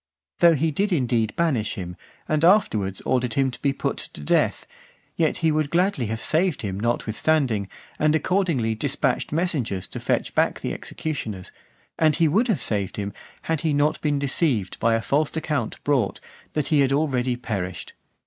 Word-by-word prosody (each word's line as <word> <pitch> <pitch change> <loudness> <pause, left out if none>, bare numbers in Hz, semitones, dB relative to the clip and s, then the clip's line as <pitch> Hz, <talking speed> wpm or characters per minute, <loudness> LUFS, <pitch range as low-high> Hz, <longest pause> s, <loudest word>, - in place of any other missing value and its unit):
(456) - - -22
Though 165 -3 +5
he 160 - +1
did 195 +3 +1
indeed 120 -4 0
banish 135 -11 0
him, 90 -2 -6 0.3
and 155 0 0
afterwards 110 - +3
ordered 125 -3 0
him 135 -1 +2
to 125 - -10
be 140 - +2
put 135 - -2
to - - -7
death, 75 - +1 0.5
yet 160 -2 +1
he 160 - +4
would 155 -1 0
gladly 175 - +1
have 110 +1 -3
saved 165 -3 +1
him 95 -2 -3
notwithstanding, 115 0 0 0.3
and 155 0 +3
accordingly 160 - +1
dispatched 140 +5 0
messengers 145 - -1
to - - -6
fetch - - -1
back - - +1
the - - -2
executioners; 110 -12 -5 0.5
and 155 -2 +4
he 165 -1 +3
would 210 - +2
have 215 -7 0
saved 100 -3 -2
him, 100 -1 -3 0.3
had 160 -3 -1
he 160 -2 +1
not 145 +1 +1
been 145 -2 +1
deceived 140 - 0
by 115 0 +3
a 115 - -1
false 150 +5 0
account 150 -7 -2
brought, 135 -8 +1 0.3
that 150 -2 -1
he 150 - +3
had 135 -1 +3
already 130 -4 +1
perished. 100 -7 -5
140 Hz, 175 wpm, -24 LUFS, 110-160 Hz, 0.5 s, Though